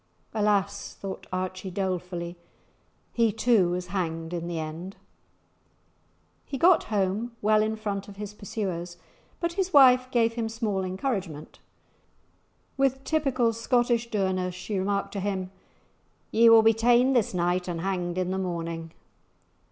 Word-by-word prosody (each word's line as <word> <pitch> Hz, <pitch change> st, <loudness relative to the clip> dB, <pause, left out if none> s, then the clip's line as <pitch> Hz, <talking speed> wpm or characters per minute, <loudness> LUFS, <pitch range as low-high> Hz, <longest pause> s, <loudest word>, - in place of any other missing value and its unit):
"Alas!" 205 Hz, -2 st, 0 dB
thought 195 Hz, -1 st, -7 dB
Archie, 185 Hz, +1 st, -3 dB
dolefully, 180 Hz, -2 st, -3 dB, 0.8 s
"he 230 Hz, -2 st, +3 dB
too 225 Hz, -4 st, +3 dB
was 180 Hz, +1 st, -2 dB
hanged 165 Hz, -3 st, -3 dB
in 170 Hz, -1 st, -3 dB
the 170 Hz, -1 st, -3 dB
end!" 160 Hz, +5 st, -6 dB, 1.5 s
He 275 Hz, -, -5 dB
got 345 Hz, +5 st, +5 dB
home 210 Hz, +3 st, -1 dB
well 215 Hz, +1 st, +3 dB
in 220 Hz, +1 st, 0 dB
front 205 Hz, -2 st, -4 dB
of 200 Hz, -, -11 dB
his 210 Hz, 0 st, -7 dB
pursuers, 185 Hz, -4 st, -5 dB, 0.4 s
but 340 Hz, -1 st, -1 dB
his 375 Hz, 0 st, -2 dB
wife 255 Hz, -2 st, +7 dB
gave 230 Hz, -2 st, +2 dB
him 230 Hz, -1 st, -2 dB
small 220 Hz, -4 st, -2 dB
encouragement. 185 Hz, -, -4 dB, 1.2 s
With 270 Hz, -1 st, +1 dB
typical 265 Hz, -5 st, +1 dB
Scottish 235 Hz, 0 st, +1 dB
dourness 185 Hz, -3 st, -1 dB
she 195 Hz, +2 st, -3 dB
remarked 200 Hz, +1 st, -1 dB
to 200 Hz, -, -3 dB
him, 190 Hz, -1 st, -3 dB, 0.8 s
"Ye 230 Hz, +1 st, +6 dB
will 225 Hz, -1 st, +8 dB
be 225 Hz, 0 st, +6 dB
ta'en 240 Hz, +4 st, +4 dB
this 230 Hz, -6 st, +1 dB
night 180 Hz, +1 st, 0 dB
and 170 Hz, -2 st, -3 dB
hanged 180 Hz, -2 st, -2 dB
i' 185 Hz, -, +2 dB
the 185 Hz, +1 st, -2 dB
morning." 165 Hz, -3 st, -4 dB
200 Hz, 140 wpm, -27 LUFS, 180-230 Hz, 1.5 s, will